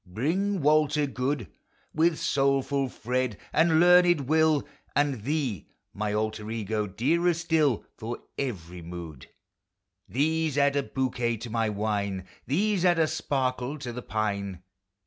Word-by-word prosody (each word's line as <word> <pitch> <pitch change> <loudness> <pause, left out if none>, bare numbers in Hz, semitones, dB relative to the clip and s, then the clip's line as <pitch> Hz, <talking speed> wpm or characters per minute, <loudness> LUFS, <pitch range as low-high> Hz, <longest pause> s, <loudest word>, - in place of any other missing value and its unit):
Bring 170 - -1
Walter 150 0 +3
good: 130 -3 -2 0.5
With 160 0 +3
soulful 135 0 +1
Fred; 125 -1 -2 0.2
and 160 0 +4
learned 175 -2 +6
Will, 155 +1 +2 0.3
And 140 -5 +1
thee, 135 - -2 0.3
my 105 0 -2
alter 110 0 -2
ego 110 -1 -2
(dearer 165 - +1
still 160 -7 +1
For 115 +2 -5 0.2
every 90 -10 -4
mood 85 -5 -8 0.4
). 95 0 -45
These 155 +2 0
add 140 0 +3
a 140 - +3
bouquet 125 -3 -1
to 115 +2 -7
1113' 110 -2 0
wine! 100 -3 -2 0.2
These 195 +6 +1
add 175 -2 +4
a 160 - +4
sparkle 130 -2 -1
to 125 -4 -6
the 125 - -5
pine 100 -5 -3
130 Hz, 135 wpm, -27 LUFS, 105-155 Hz, 0.5 s, learned